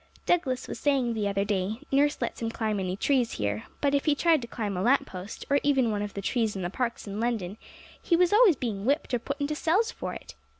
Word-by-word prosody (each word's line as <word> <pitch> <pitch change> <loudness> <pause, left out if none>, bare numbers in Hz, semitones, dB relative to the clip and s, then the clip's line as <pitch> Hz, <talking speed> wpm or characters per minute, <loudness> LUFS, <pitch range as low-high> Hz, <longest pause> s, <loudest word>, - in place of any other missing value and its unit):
Douglas 265 -8 +1
was - - -6
saying 270 -5 +1
the 215 -2 -1
other 200 0 0
day, 200 +1 -1
nurse 290 +2 +3
lets 235 - -4
him 225 - -1
climb 220 -2 -2
any 185 0 -2
trees 250 0 +1
here; 105 0 -2 0.2
but 280 -1 +2
if 280 - +1
he 300 -2 +3
tried 320 -1 +3
to 235 - -6
climb 210 -4 -3
a 180 - -2
lamp 260 +7 +3
post, 185 +2 -8
or 285 0 +3
even 270 -5 +2
one 205 -1 -1
of 205 -1 -5
the 200 - -4
trees 225 -1 0
in 190 - -4
the 175 - -3
parks, 240 +1 -2
in 205 0 -5
London, 220 -5 -1 0.5
he 340 - +2
was 360 +2 +3
always 425 -6 +7
being 220 -7 -3
whipped 280 +3 0
or 245 - +2
put 280 +5 -5
into 285 +1 -1
cells 370 +9 +1
for - - -5
it! - - -10
235 Hz, 250 wpm, -27 LUFS, 205-285 Hz, 0.5 s, always